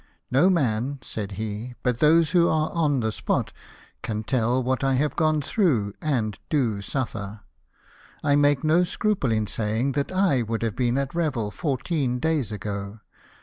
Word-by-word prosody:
" -, -, -50 dB
No 145 Hz, +9 st, +5 dB
man," 135 Hz, -, 0 dB
said 105 Hz, -2 st, -5 dB
he, 110 Hz, +4 st, -5 dB
" -, -, -42 dB
but 125 Hz, -2 st, 0 dB
those 160 Hz, +1 st, +4 dB
who 170 Hz, -2 st, +4 dB
are 155 Hz, 0 st, +1 dB
on 150 Hz, -6 st, +1 dB
the 110 Hz, -1 st, 0 dB
spot -, -, -2 dB, 0.5 s
can 110 Hz, -2 st, -3 dB
tell 125 Hz, +2 st, +1 dB
what 130 Hz, +2 st, -1 dB
I 135 Hz, -1 st, +2 dB
have 145 Hz, +3 st, 0 dB
gone 155 Hz, -2 st, +2 dB
through, 130 Hz, -, +1 dB
and 115 Hz, -9 st, -1 dB
do 120 Hz, -9 st, +1 dB
suffer. 105 Hz, -4 st, -4 dB, 0.8 s
I 145 Hz, -, +3 dB
make 145 Hz, -1 st, +3 dB
no 160 Hz, +3 st, +4 dB
scruple 185 Hz, -, 0 dB
in 110 Hz, -1 st, +1 dB
saying 110 Hz, +5 st, -1 dB
that 140 Hz, +4 st, -2 dB
I 185 Hz, -9 st, +2 dB
would 115 Hz, 0 st, -2 dB
have 115 Hz, -3 st, -1 dB
been 125 Hz, 0 st, +1 dB
at 140 Hz, -1 st, -2 dB
Revel 145 Hz, -11 st, -1 dB
fourteen 135 Hz, -, -1 dB
days 145 Hz, -5 st, 0 dB
ago 100 Hz, +1 st, -5 dB
130 Hz, 175 wpm, -25 LUFS, 110-150 Hz, 0.8 s, No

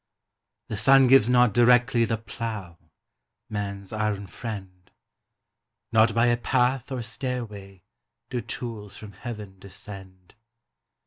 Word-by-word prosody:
The 110 Hz, -, -3 dB
sun 135 Hz, +5 st, +6 dB
gives 130 Hz, -3 st, +6 dB
not 125 Hz, -3 st, +4 dB
directly 120 Hz, +1 st, +4 dB
The 115 Hz, 0 st, -1 dB
plough, 110 Hz, -6 st, -6 dB, 0.7 s
man's 100 Hz, -1 st, -5 dB
iron 105 Hz, -2 st, -1 dB
friend; 95 Hz, -2 st, -8 dB, 1.0 s
Not 110 Hz, -1 st, +4 dB
by 115 Hz, +1 st, +4 dB
a 120 Hz, 0 st, +3 dB
path 125 Hz, +2 st, 0 dB
or 125 Hz, -3 st, -3 dB
stairway 110 Hz, -6 st, -5 dB, 0.5 s
Do 125 Hz, -, -1 dB
tools 115 Hz, -6 st, -6 dB
from 105 Hz, -2 st, -10 dB
Heaven 105 Hz, -2 st, -8 dB
descend. 95 Hz, -1 st, -12 dB
110 Hz, 115 wpm, -26 LUFS, 100-120 Hz, 1.0 s, sun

